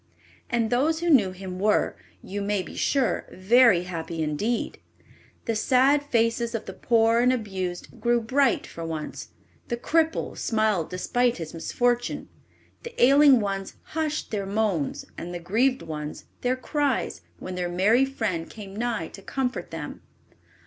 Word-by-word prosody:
And 230 -2 0
those 300 +6 +2
who 345 -1 +2
knew 210 -10 +5
him 185 0 -7
were, 210 +2 +2 0.3
you 200 +2 -4
may 200 -1 0
be - - -10
sure, 270 -4 +1
very 215 -1 +5
happy 165 -2 -4
indeed. 210 +11 -2 0.7
The 230 - 0
sad 265 +6 +4
faces 235 -3 0
of 225 - -4
the 190 - -7
poor 230 +1 +3
and 250 +1 +4
abused 190 -3 -4
grew 240 +1 +3
bright 265 +5 +2
for 165 - -8
once; 160 -2 -5 0.4
the 240 - -2
cripple 320 +6 0
smiled 215 -7 0
despite 240 +7 0
his 165 -3 -6
misfortune; 245 +8 -1 0.5
the 470 - -9
ailing 275 +1 +7
ones 195 -1 -3 0.2
hushed 310 -1 -2
their 200 -3 -2
moans 200 -8 -1
and 175 +1 -6
the - - -4
grieved 235 +10 +1
ones 150 -1 -6 0.2
their 250 +1 +1
cries 265 - -1 0.2
when 185 - -7
their 180 -1 -2
merry 205 +8 +4
friend 220 -11 -2
came 200 -3 -10
nigh 225 -7 -2
to 195 - -12
comfort 250 -4 -3
them. 160 -3 -7
220 Hz, 150 wpm, -26 LUFS, 185-250 Hz, 0.7 s, ailing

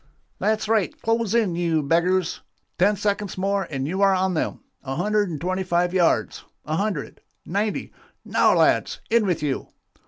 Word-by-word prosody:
'That's 215 0 0
right, 220 -4 +1
close 225 -1 +1
in, 210 -7 +2
you 165 -3 +1
beggars! 170 +4 +1 0.4
Ten 200 +4 +4
seconds 205 -1 -2
more 195 +1 0
and 135 -2 -3
you 190 +5 -2
are 195 -1 +5
on 185 0 +1
them! 160 - -2 0.2
A 135 -1 -4
hundred 205 +3 +1
and 155 -4 -5
twenty 185 +3 -1
five 180 -1 0
yards 180 -3 +1 0.2
a 155 - -2
hundred 195 -7 -3 0.2
ninety 205 +4 -2 0.3
now, - - +3
lads, - - +2
in 230 -3 +3
with 165 -4 -1
you. 140 -3 -2
185 Hz, 165 wpm, -23 LUFS, 170-205 Hz, 0.4 s, are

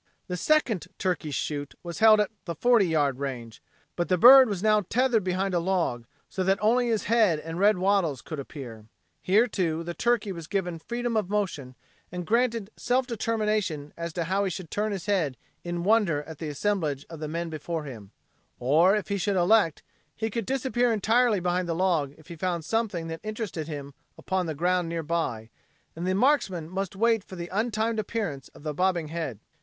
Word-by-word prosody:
The 180 - -3
second 225 - +1
turkey 180 -4 -1
shoot 145 0 -3
was 170 -1 -6
held 220 -1 +7
at 210 - +1
the 170 -2 -4
forty 235 -1 +4
yard 145 -5 +1
range. 120 -5 -5 0.3
But 175 - -2
the 185 - +3
bird 255 +5 +9
was 195 -2 -3
now 215 -1 +4
tethered 245 -3 +2
behind 185 +1 -1
a 175 - +2
log, 170 -10 -1 0.2
so 190 - -3
that 190 +1 +2
only 240 +3 +3
his 225 -2 0
head 215 -8 +3
and 165 +2 -6
red 205 0 +4
wattles 180 -8 +1
could 155 -3 -6
appear. 120 -6 -9 0.3
Here, 210 +6 +4
too, 170 -8 -1
the 175 +1 -5
turkey 235 -1 0
was 170 -4 -7
given 180 -3 -2
freedom 240 +5 -3
of 210 -4 0
motion 170 -11 -2 0.4
and 180 0 -5
granted 230 -1 +1
self 250 +1 +1
determination 215 - -1
as 170 0 -5
to 170 - -1
how 190 +4 0
he 195 - 0
should 180 -2 -7
turn 210 +1 -1
his 195 -4 -4
head 170 - 0 0.3
in 175 0 -3
wonder 195 -8 +2
at 160 0 -10
the 160 - -4
assemblage 150 -4 -1
of 165 -2 -9
men 170 +1 -3
before 160 +1 -4
him; 115 -9 -9 0.5
or, 160 +10 +4
if 210 - -3
he 200 0 -1
should 200 +1 0
elect, 180 -2 +3 0.3
he 220 0 -3
could 230 -2 -3
disappear 255 -2 +1
entirely 225 +1 +3
behind 180 0 -1
the 165 - 0
log 165 -6 +1
if 155 - -19
he 170 - -7
found 170 -1 -2
something 215 -7 -1
that 165 0 -5
interested 215 -7 -4
him 140 -3 -6 0.2
upon 185 -2 -2
the 160 - -3
ground 175 +2 +1
nearby, 160 -9 -2 0.4
and 170 +3 -4
the 185 - +1
marksman 200 - +2
must 195 +2 -4
wait 225 0 +2
for 190 - -11
the 175 -1 -6
untimed 220 +1 0
appearance 200 - -3
of - - -14
the 155 -1 -3
bobbing 175 -1 0
head. 160 -10 -4
185 Hz, 195 wpm, -27 LUFS, 160-215 Hz, 0.5 s, bird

